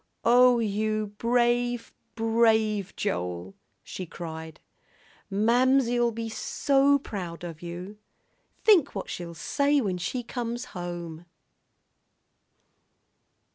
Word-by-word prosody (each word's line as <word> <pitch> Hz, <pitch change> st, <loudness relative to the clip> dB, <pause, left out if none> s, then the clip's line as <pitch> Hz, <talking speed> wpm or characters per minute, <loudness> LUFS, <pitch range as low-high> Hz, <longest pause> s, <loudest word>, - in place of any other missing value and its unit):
"Oh, 245 Hz, +1 st, +6 dB
you 215 Hz, -1 st, -1 dB
brave, 240 Hz, 0 st, +1 dB, 0.2 s
brave 220 Hz, -3 st, +2 dB
Joel," 90 Hz, +1 st, -3 dB, 0.3 s
she 185 Hz, -, -7 dB
cried. 160 Hz, -1 st, -8 dB, 0.7 s
"Mamsie'll 240 Hz, +3 st, +3 dB
be 230 Hz, 0 st, -4 dB
so 275 Hz, +5 st, +2 dB
proud 180 Hz, -10 st, -6 dB
of 165 Hz, -2 st, -7 dB
you! 180 Hz, +4 st, -7 dB, 0.6 s
Think 355 Hz, -, +5 dB
what 195 Hz, -, -4 dB
she'll 170 Hz, -1 st, -6 dB
say 285 Hz, -, +1 dB
when 190 Hz, -7 st, -1 dB
she 245 Hz, +8 st, -3 dB
comes 240 Hz, 0 st, -4 dB
home!" 175 Hz, -2 st, -6 dB
220 Hz, 95 wpm, -27 LUFS, 175-245 Hz, 0.7 s, Oh